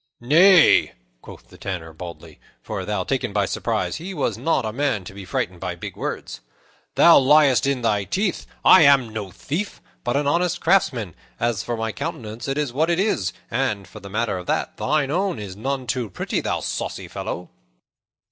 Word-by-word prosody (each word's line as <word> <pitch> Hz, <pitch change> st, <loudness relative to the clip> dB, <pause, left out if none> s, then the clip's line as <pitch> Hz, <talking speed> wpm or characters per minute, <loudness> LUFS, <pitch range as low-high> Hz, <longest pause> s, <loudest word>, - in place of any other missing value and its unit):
"Nay," 165 Hz, +8 st, +6 dB, 0.3 s
quoth -, -, -13 dB
the -, -, -16 dB
Tanner 85 Hz, -4 st, -5 dB
boldly 85 Hz, +1 st, -10 dB, 0.2 s
for, -, -, -4 dB
though -, -, -1 dB
taken -, -, -2 dB
by -, -, +2 dB
surprise, -, -, -2 dB
he 180 Hz, +4 st, -7 dB
was -, -, -1 dB
not 160 Hz, -7 st, 0 dB
a 110 Hz, -, -3 dB
man 135 Hz, -6 st, 0 dB
to 90 Hz, -, -10 dB
be 100 Hz, -1 st, -9 dB
frightened 90 Hz, 0 st, -3 dB
by 90 Hz, -1 st, -4 dB
big 85 Hz, -, -8 dB
words -, -, -5 dB, 0.5 s
"thou 170 Hz, -, +8 dB
liest 135 Hz, -3 st, +4 dB
in 135 Hz, -3 st, 0 dB
thy 105 Hz, -3 st, +1 dB
teeth. 195 Hz, -, -1 dB, 0.2 s
I 185 Hz, -, +9 dB
am 140 Hz, -5 st, +5 dB
no 110 Hz, -3 st, -5 dB
thief, 165 Hz, -, -4 dB, 0.2 s
but 120 Hz, +3 st, 0 dB
an 145 Hz, -, 0 dB
honest 170 Hz, +4 st, +1 dB
craftsman. 120 Hz, -, +1 dB, 0.3 s
As 115 Hz, -4 st, 0 dB
for 120 Hz, -1 st, -3 dB
my 115 Hz, 0 st, -2 dB
countenance, 110 Hz, +2 st, -6 dB
it 135 Hz, +1 st, -2 dB
is 145 Hz, -5 st, -1 dB
what 155 Hz, +5 st, +1 dB
it 170 Hz, +1 st, +1 dB
is; 190 Hz, -, +1 dB, 0.2 s
and, 110 Hz, -6 st, -1 dB
for 105 Hz, -, -11 dB
the 100 Hz, -1 st, -10 dB
matter 105 Hz, -2 st, -1 dB
of 90 Hz, -, -10 dB
that, -, -, -1 dB
thine 145 Hz, -3 st, 0 dB
own 190 Hz, +1 st, 0 dB
is 100 Hz, -3 st, -7 dB
none 130 Hz, +5 st, -3 dB
too 120 Hz, -2 st, -2 dB
pretty, 90 Hz, -, -3 dB
thou -, -, -2 dB
saucy -, -, -4 dB
fellow." 90 Hz, -, -6 dB
120 Hz, 190 wpm, -22 LUFS, 100-150 Hz, 0.5 s, I